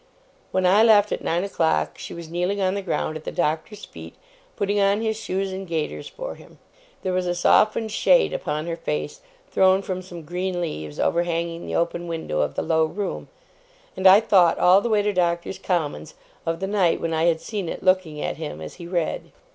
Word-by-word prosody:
When 185 0 0
I 195 +4 +5
left, 210 -2 +5
at - - -3
nine 170 +2 0
o'clock, 75 - 0
she - - -7
was 170 -1 -8
kneeling 180 +4 -1
on 190 -1 +1
the 200 - -2
ground 155 -4 -2
at 155 - -12
the - - -5
Doctor's 160 +7 -2
feet, - - -11 0.4
putting 205 0 0
on 200 +1 +3
his 220 -1 -1
shoes 195 -2 -3
and 190 0 -6
gaiters 160 -2 -3
for - - -6
him. - - -16 0.5
There 185 - -1
was 180 0 0
a 175 - 0
softened 215 +5 +3
shade - - +3
upon 155 - -3
her 170 -1 -3
face, 165 - -4 0.3
thrown 190 +1 +4
from 185 -1 -4
some 175 -3 -10
green 180 +3 -3
leaves 75 - -5
overhanging 170 0 -1
the - - -3
open 170 +1 -1
window 160 - -3
of 75 - -2
the - - -1
low 160 -1 +2
room; 195 +5 -4 0.7
and 190 0 +4
I 195 +3 +8
thought 185 -6 +4
all 185 +2 +5
the 235 - -2
way 210 -2 +3
to 205 0 0
Doctors' 175 0 -1
Commons, 175 - -2 0.3
of 165 +2 -1
the - - 0
night 195 -4 +2
when 165 - -2
I 160 +1 +1
had 165 -1 +2
seen 200 -2 -4
it - - -6
looking 185 -5 +1
at - - -3
him 155 - -6
as 80 -1 -8
he 170 - -7
read. 175 -3 -2
180 Hz, 210 wpm, -23 LUFS, 165-200 Hz, 0.7 s, I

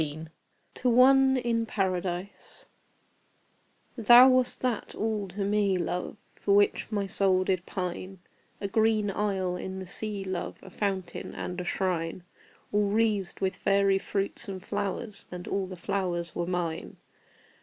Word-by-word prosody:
TO 250 - 0
ONE 265 +2 +6
IN 230 -2 0
PARADISE, 185 -1 -3 1.3
Thou 240 +3 +8
wast 255 -1 +2
that 250 -4 -2
all 215 -2 -1
to 190 +3 -6
me, 200 -2 +2
love, 180 +4 -3 0.2
For 200 - +1
which 205 0 +3
my 205 -2 0
soul 190 -1 +2
did 185 -1 -1
pine 185 +1 -4 0.4
A 200 - -2
green 215 0 +2
isle 190 -3 -1
in 190 +1 -5
the 190 - -6
sea, 205 +2 -4
love, 185 -2 -4
A 190 - -12
fountain 195 -1 -3
and 180 0 -4
a - - -6
shrine, 175 -2 -2 0.5
All 205 -1 +2
wreathed 210 -3 0
with 190 -1 0
fairy 195 0 +2
fruits 200 +3 -3
and 190 -1 -6
flowers, 205 +1 -3
And 180 0 -7
all 195 -1 -1
the 185 - -7
flowers 175 -2 -2
were 175 - -2
mine. 175 -3 -3
195 Hz, 145 wpm, -28 LUFS, 185-210 Hz, 1.3 s, Thou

